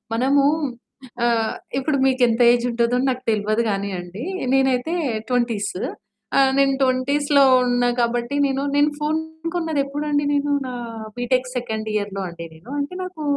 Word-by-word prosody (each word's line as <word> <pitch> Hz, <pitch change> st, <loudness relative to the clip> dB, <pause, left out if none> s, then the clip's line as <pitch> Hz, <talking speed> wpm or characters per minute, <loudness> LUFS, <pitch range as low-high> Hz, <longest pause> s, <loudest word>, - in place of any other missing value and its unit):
మనము 275 Hz, +4 st, +3 dB, 0.8 s
ఆహ్, 230 Hz, -2 st, +1 dB, 0.3 s
ఇప్పుడు 280 Hz, +1 st, 0 dB
మీకెంత 250 Hz, -3 st, +2 dB
ఏజుంటదో 240 Hz, 0 st, +1 dB
నాకు 255 Hz, 0 st, -3 dB
తెల్వదు 215 Hz, +2 st, 0 dB
గానీ 200 Hz, 0 st, -2 dB
అండి, 180 Hz, +8 st, -7 dB, 0.3 s
నేనైతే 265 Hz, +5 st, +1 dB, 0.4 s
ట్వెంటీస్. 235 Hz, -6 st, 0 dB, 0.6 s
ఆహ్, 270 Hz, -1 st, +5 dB
నేను 275 Hz, 0 st, +4 dB
20స్‌లో 280 Hz, +2 st, +3 dB, 0.2 s
ఉన్నా 245 Hz, 0 st, +2 dB
కాబట్టి, 240 Hz, +3 st, -1 dB
నేను 270 Hz, 0 st, -1 dB, 0.2 s
నేను 295 Hz, +1 st, +4 dB
ఫోను 320 Hz, +2 st, -3 dB
కొన్నదెప్పుడండి, 290 Hz, -2 st, -1 dB
నేను 285 Hz, 0 st, 0 dB, 0.2 s
నా 250 Hz, -, -5 dB, 0.4 s
బీటెక్ 250 Hz, +1 st, 0 dB
సెకండ్ 220 Hz, -3 st, -4 dB
ఇయర్‌లో 200 Hz, -1 st, -2 dB
అండి 170 Hz, 0 st, -8 dB
నేను, 165 Hz, +9 st, -16 dB
అంటే 285 Hz, +5 st, -3 dB
నాకూ 365 Hz, -4 st, -7 dB
255 Hz, 130 wpm, -22 LUFS, 235-285 Hz, 0.8 s, ఆహ్